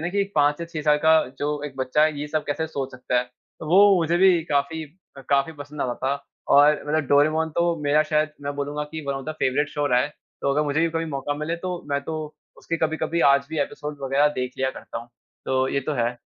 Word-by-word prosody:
ना 175 - 0
कि 200 +1 +1
5 145 +1 +3
या 170 - -4
6 165 -2 -5
साल 150 0 +4
का 160 0 +7 0.2
जो 145 0 -2
एक 135 -2 -10
बच्चा 130 +3 +1
है 155 -2 -1
ये 150 - -3
सब 155 0 -1
कैसे 160 +2 -1
सोच 135 -4 -4
सकता 125 -1 -1
है। 125 - 0 0.4
तो - - -6
वो 195 +2 +6
मुझे 170 0 +1
भी 180 -2 +5
काफ़ी 150 +1 -1 0.4
काफ़ी 140 +3 +2
पसंद 145 0 -9
आता 125 -1 -1
था। 140 +1 -2 0.3
और 145 +1 +6
मतलब 155 -1 0
डोरेमॉन 155 +3 +3
तो 170 0 +2
मेरा 150 +1 +3
शायद 155 0 0
मैं 145 0 -3
बोलूँगा 145 +1 -3
कि 160 - -4
von 140 - -1
of 135 - -5
the 155 - -2
favourite 145 -1 0
show 145 0 -1
रहा 125 -2 +3
है। 140 - 0 0.3
तो 140 - +1
अगर 150 +2 +2
मुझे 145 +2 0
भी 165 - +3
कभी 165 0 -2
मौका 145 -2 -3
मिले 155 +3 -3
तो 180 0 -4
मैं 140 - +1
तो 160 - -4 0.4
उसके 165 - -3
कभी-कभी 160 +1 -1
आज 140 0 +2
भी 160 - -3
एपिसोड 145 +1 -4
वग़ैरह 135 +2 +3
देख 125 0 -3
लिया 130 0 +1
करता - - -8
हूँ। 115 +1 -11 0.4
तो 130 0 +1
ये 140 - 0
तो 150 +3 -3
है। 120 -1 -1
150 Hz, 245 wpm, -24 LUFS, 140-160 Hz, 0.4 s, का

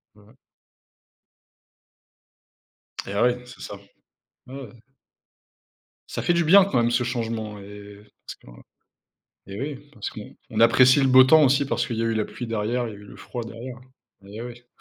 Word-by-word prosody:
Heu 105 +4 -21 2.7
Et 100 - -5
ouais, 125 +3 +1
c'est 120 - -13
ça. 100 - -7 0.7
Ouais, 130 - -11
ouais. 130 -6 -9 1.4
Ça - - -4
fait 175 - +2
du 170 0 +2
bien 190 +4 +7
quand 195 - -1
même 120 0 +2
ce 120 +1 +1
changement 115 -3 -4
et 100 0 -12 0.3
parce - - -8
que - - -24 1.0
et 100 +1 -8
oui, 145 0 -6
parce 105 - -6
qu'on 110 0 -8
apprécie 130 +4 +6
le 135 - +3
beau 130 0 +8
temps 155 +2 +6
aussi 140 +2 +3
parce 120 -2 -1
qu'il 115 - -4
y 115 - -1
a - - 0
eu 115 0 0
la 110 -1 0
pluie 120 - -7
derrière 115 +2 -2
et - - -6
y - - -9
a - - -10
eu 105 - -14
le - - -13
froid 120 -2 -7
derrière 120 +2 -9 0.4
et 105 +3 -9
ouais. 120 0 -10
120 Hz, 180 wpm, -24 LUFS, 110-130 Hz, 2.7 s, beau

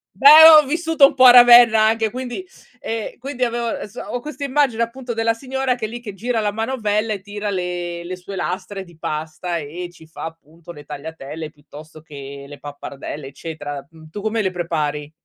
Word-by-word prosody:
Beh, 300 +3 +9
ho 305 -2 +8
vissuto 325 0 +3
un - - +2
po' 260 -1 +5
a 245 - +11
Ravenna 240 -2 +8
anche 220 0 +2
quindi 255 - -6 0.4
ehm, 225 -1 -5
quindi 255 -1 -4
avev 235 -1 -2
so 215 +4 -9
ho 245 - -5
questa 295 +2 -8
immagine 265 -4 +1
appunto 245 +1 -4
della 225 0 0
signora 265 +1 -2
che 235 -3 -4
è - - -3
lì 240 +2 -7
che 215 -4 -8
gira 230 +4 -2
la 210 -1 -1
manovella 220 -1 -1
e 200 - -6
tira 205 +1 -5
le 175 -2 -4
le 180 +2 -6
sue 185 +2 -10
lastre 190 +2 -4
di 175 -3 -18
pasta 160 +3 -4
e 165 +4 -6
ci 160 -2 -17
fa 160 - -10
appunto 165 +1 -12
le 150 -3 -12
tagliatelle, 150 +1 -8
piuttosto 155 +1 -14
che 140 -2 -10
le 145 0 -11
pappardelle 145 0 -8
eccetera. 145 -1 -7
Uhm, 160 -1 -16
tu 205 +6 -8
come 220 +1 -1
le 190 -2 -1
prepari? 150 -4 -3
205 Hz, 195 wpm, -20 LUFS, 160-240 Hz, 0.4 s, a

